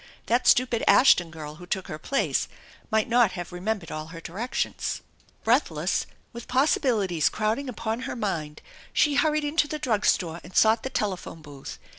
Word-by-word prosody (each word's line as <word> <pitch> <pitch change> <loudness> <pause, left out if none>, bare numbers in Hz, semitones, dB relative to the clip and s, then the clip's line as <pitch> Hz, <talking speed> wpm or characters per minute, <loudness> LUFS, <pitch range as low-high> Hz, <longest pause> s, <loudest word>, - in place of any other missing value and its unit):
That 240 +2 +1
stupid 245 -2 +4
Ashton 180 -10 +6
girl 155 -1 -8
who 175 - -10
took 190 +1 -2
her 155 - -6
place 275 - 0 0.4
might 220 -1 +2
not 235 -5 +3
have 175 -2 -6
remembered 185 0 -3
all 155 0 -5
her 165 0 -9
directions. 200 +10 -3 0.4
Breathless, - - +1 0.3
with 235 0 -9
possibilities 235 - +2
crowding 220 +6 -1
upon 225 -1 -3
her 255 - -5
mind, 165 -10 -3 0.3
she 295 - +3
hurried 305 +1 +2
into 295 +1 +1
the 305 - -3
drug 220 -8 0
store 170 -2 +1
and 180 - -13
sought 220 +1 +5
the 265 - -4
telephone 185 -8 -3
booth. 140 -2 -9
215 Hz, 165 wpm, -26 LUFS, 170-250 Hz, 0.4 s, Ashton